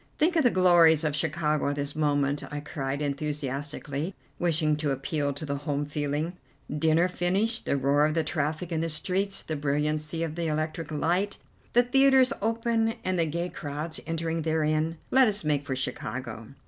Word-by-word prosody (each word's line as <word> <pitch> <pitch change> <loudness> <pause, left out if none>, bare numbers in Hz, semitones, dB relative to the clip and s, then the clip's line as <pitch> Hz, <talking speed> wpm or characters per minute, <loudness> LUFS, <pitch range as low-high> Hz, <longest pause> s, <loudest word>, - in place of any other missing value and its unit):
"Think 330 +3 +2
of 325 - +5
the 250 - +5
glories 175 -5 +5
of 150 -2 0
Chicago 150 -1 0
at 145 - -1
this 145 0 -3
moment!" 145 -2 +1
I 145 - -3
cried 140 -1 -3
enthusiastically, 145 +2 -3 0.2
wishing 160 -3 +2
to 150 -1 -1
appeal 140 +2 -1
to 145 +3 -6
the 140 -1 -2
home 145 0 -2
feeling. 145 +3 -2 0.4
"Dinner 160 +3 +3
finished; 190 +6 0
the 140 - +2
roar 140 +2 +3
of 155 - -2
the 165 - +2
traffic 155 +2 -2
in 160 -1 0
the 165 - -1
streets; 190 +5 -1
the 155 - -3
brilliancy 150 +3 -1
of 160 -2 -3
the 165 0 -2
electric 155 0 -2
light; 175 +7 0 0.4
the 245 - +6
theatres 265 +1 +5
open, 225 +1 +1
and 185 -1 0
the 165 - +2
gay 170 +3 -2
crowds 150 +2 -5
entering 165 0 -1
therein. 155 0 0
Let 265 -1 +6
us 205 -3 -1
make 145 -2 0
for 130 - -1
Chicago." 120 -2 -4
155 Hz, 175 wpm, -27 LUFS, 145-175 Hz, 0.4 s, the